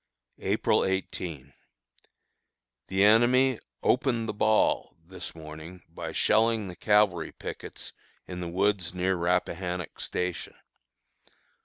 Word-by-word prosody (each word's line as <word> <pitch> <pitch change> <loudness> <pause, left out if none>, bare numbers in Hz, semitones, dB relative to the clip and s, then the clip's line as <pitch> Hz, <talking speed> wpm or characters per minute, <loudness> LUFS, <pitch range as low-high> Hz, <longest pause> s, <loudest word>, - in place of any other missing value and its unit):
April - - +2
18. 85 -7 -3 1.3
The 95 +1 +2
enemy 120 +4 +5 0.2
"opened 120 -3 +2
the - - -2
ball" 110 +1 +2
this 95 0 -8
morning 80 +2 -10
by 80 - -6
shelling 110 -1 +2
the 90 - -8
cavalry 105 -3 +2
pickets - - -8 0.3
in 90 -1 -6
the 90 - -4
woods 95 0 0
near 95 +1 +1
Rappahannock 90 0 -1
Station. 90 -2 -3
95 Hz, 105 wpm, -28 LUFS, 85-105 Hz, 1.3 s, enemy